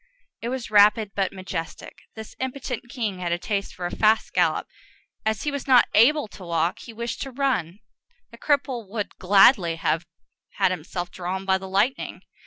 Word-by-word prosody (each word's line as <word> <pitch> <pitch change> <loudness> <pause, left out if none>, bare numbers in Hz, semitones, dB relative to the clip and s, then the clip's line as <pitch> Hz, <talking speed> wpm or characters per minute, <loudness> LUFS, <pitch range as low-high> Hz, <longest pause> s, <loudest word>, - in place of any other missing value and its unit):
It 235 - -3
was 255 -3 -5
rapid 210 0 +5
but 195 -2 0
majestic. 185 -3 -6 0.2
This 220 -1 -9
impotent 260 -2 -4
king 220 -8 -3
had 175 -1 -2
a 170 - +1
taste 200 +2 -3
for 180 - -5
a 175 - -4
fast 220 0 +2
gallop; - - +2 0.6
as 220 -1 0
he 295 - -1
was 280 -1 -5
not 255 -2 +6
able 290 +5 +5
to 195 - -12
walk, 170 0 -1
he 235 - -10
wished 235 +1 -5
to 270 - -4
run: 255 - -1 0.5
that 235 - -14
cripple 265 -7 0
would 210 -1 -4
gladly 195 -2 +5
have 165 +1 -1 0.5
had 185 - +2
himself 175 0 -5
drawn 185 +2 -4
by 190 0 +2
the 190 0 -8
lightning. 210 +8 0
205 Hz, 180 wpm, -24 LUFS, 185-245 Hz, 0.6 s, not